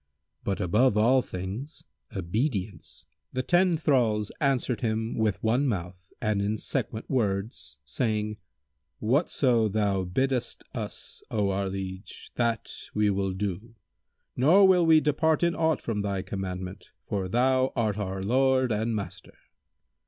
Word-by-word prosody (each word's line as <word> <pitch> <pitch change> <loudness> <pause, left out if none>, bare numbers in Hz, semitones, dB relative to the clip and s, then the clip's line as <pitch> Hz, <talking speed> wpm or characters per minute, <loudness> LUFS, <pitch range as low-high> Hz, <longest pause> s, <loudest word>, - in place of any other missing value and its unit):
But 100 - -1
above 105 +5 +3
all 125 +5 +5
things 100 - -6 0.3
obedience!" 100 - -3 0.3
The 130 - -1
ten 175 +2 +3
thralls 115 -9 +1
answered 135 -4 +1
him 110 -1 -1
with 110 -3 0
one 120 +6 +2
mouth 90 -4 -4
and 105 -3 0
in 105 +2 0
sequent 110 +1 -3
words, 100 - -2
saying, 105 - -1 0.6
"Whatso 125 -2 +2
thou 100 -2 0
biddest 130 +7 -1
us, - - -6
O 105 -3 0
our 95 0 -1
liege, 95 +1 -7
that 115 -2 -1 0.2
we 105 -1 +3
will 95 -1 -1
do, 105 +4 -4 0.6
nor 180 +10 +6
will 180 -3 +4
we 160 -1 +7
depart 155 +2 +2
in 170 0 +3
aught 160 -2 +1
from 110 -3 -2
thy 100 -2 -2
commandment, 95 -1 -5 0.2
for 95 -2 -2
thou 130 +3 +2
art 110 -4 0
our 95 -1 -3
lord 130 +3 +2
and 110 +1 0
master." 100 -2 -7
110 Hz, 135 wpm, -27 LUFS, 100-130 Hz, 0.6 s, we